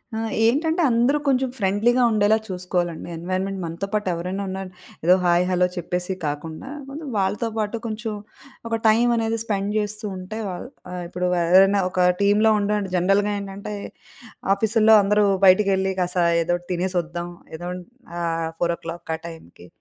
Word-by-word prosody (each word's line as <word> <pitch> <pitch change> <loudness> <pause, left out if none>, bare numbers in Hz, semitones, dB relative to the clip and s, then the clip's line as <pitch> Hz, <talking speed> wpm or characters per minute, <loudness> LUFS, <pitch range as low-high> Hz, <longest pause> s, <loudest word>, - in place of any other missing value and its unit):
ఆ! - - -2 0.3
ఏంటంటే, 320 +9 +2
అందరూ 240 +5 +3
కొంచెం 265 -1 +2
ఫ్రెండ్లీగా 220 +5 +2
ఉండేలా 215 0 +3
చూసుకోవాలండి 180 -2 -3
ఎన్వైర్మెంట్. 185 +3 -3
మనతో 170 +4 -4
పాటెవరైనా 185 -1 -2
ఉన్నా, 190 +1 -4 0.4
ఏదో 180 +2 +7
హాయ్, 175 0 +4
హలో, 180 0 +3
చెప్పేసి 180 +2 -2
కాకుండా, 155 - -5 0.2
కొంచం 295 +1 -7
వాళ్ళతో 200 +4 0
పాటు 215 +1 -1
కొంచెం, 220 0 -4 0.5
ఒక 230 0 0
టైమ్ 230 +3 +4
అనేది 225 0 0
స్పెండ్ 205 -2 -2
జేస్తూ 210 0 -2
ఉంటే, 185 +4 -6
వాళ్ 180 +6 -6 0.2
ఆహ్, 180 -1 -5
ఇప్పుడు 180 +1 -2
వారెవరైనా 190 +4 +5
ఒక 180 -1 +2 0.2
టీమ్‌లో 205 +2 +4
ఉండాలంటే, 205 -2 -1
జనరల్‌గా 195 +3 +2
ఏంటంటే, 200 +1 -7 0.8
ఆఫీసుల్లో 220 +2 +4
అందరూ 210 +1 +3 0.2
బయటికెళ్లి, 190 0 +4
కాస్త 180 -1 +1 0.2
ఏదోటి 175 +1 -2
తినేసొద్దాం, 175 -1 -2 0.3
ఏదాన్ 180 +2 -5 0.4
ఆహ్, 165 -1 -1
4:00కి 170 -1 -3
ఆ - - -26
టైంకి. 90 - -12
195 Hz, 140 wpm, -23 LUFS, 175-215 Hz, 0.8 s, ఏదో